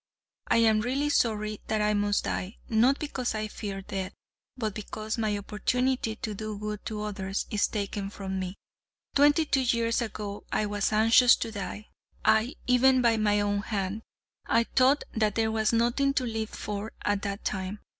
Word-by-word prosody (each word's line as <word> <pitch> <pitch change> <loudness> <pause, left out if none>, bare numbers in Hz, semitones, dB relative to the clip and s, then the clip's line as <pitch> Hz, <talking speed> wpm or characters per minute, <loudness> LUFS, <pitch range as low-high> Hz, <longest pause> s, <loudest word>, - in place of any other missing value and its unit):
I - - +3
am 220 -2 +4
really 270 +5 0
sorry 215 -5 0
that 215 0 0
I 210 0 +2
must 205 0 +1
die, 190 +4 -3
not 240 +5 +3
because 260 -6 -3
I 215 0 -2
fear 200 -2 -6
death, 190 -1 -4 0.4
but 220 -4 -2
because 215 +1 -5
my 215 -2 0
opportunity 230 +3 -1
to 215 -1 -4
do 215 0 -5
good 210 0 -5
to 210 -1 -4
others 195 -2 -3
is 210 - +2
taken 200 -1 -3
from 190 -2 -4
me. 185 0 -4 0.6
Twenty 290 +3 +5
two 275 -2 +2
years 235 -2 +1
ago 210 -2 -5
I 215 - +1
was 205 0 -1
anxious 225 +3 +6
to 225 - -4
die, 205 +1 -6 0.4
aye 220 +4 +3
even 255 +1 +4
by 230 -1 +4
my 210 -1 +2
own 205 0 0
hand. 200 0 -3 0.5
I 230 - +4
thought 260 +4 +3
that 215 -2 +1
there 220 -1 +1
was 220 -1 +1
nothing 240 +4 +2
to 260 - +1
live 225 -2 -3
for 210 +1 -5
at 205 -1 +1
that 200 0 -4
time. 190 0 -2
215 Hz, 175 wpm, -28 LUFS, 205-235 Hz, 0.6 s, anxious